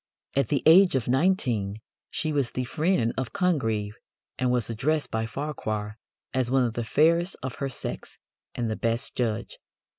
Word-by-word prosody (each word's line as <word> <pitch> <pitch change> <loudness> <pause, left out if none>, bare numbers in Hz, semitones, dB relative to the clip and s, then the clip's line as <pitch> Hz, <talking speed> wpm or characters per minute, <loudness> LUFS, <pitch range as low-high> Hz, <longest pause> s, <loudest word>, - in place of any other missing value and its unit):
At 140 - +2
the 140 -4 0
age 175 +1 +7
of 125 -4 0
nineteen 125 - +1 0.3
she 155 -1 -1
was 140 -5 +1
the 130 - -3
friend 150 -3 +1
of 130 - -4
Congreve, 115 - 0 0.5
and 125 -1 +2
was 125 -3 +1
addressed 145 +7 -1
by 110 0 -1
Farquhar 110 -6 -4 0.3
as 130 -2 +1
"one 130 0 +3
of 120 -2 -1
the 120 - -2
fairest 170 - +3
of 130 - -4
her 140 - 0
sex 130 - -6 0.4
and 120 - -1
the 110 - -1
best 115 +4 -1
judge." 115 -2 -2
130 Hz, 170 wpm, -26 LUFS, 115-150 Hz, 0.5 s, age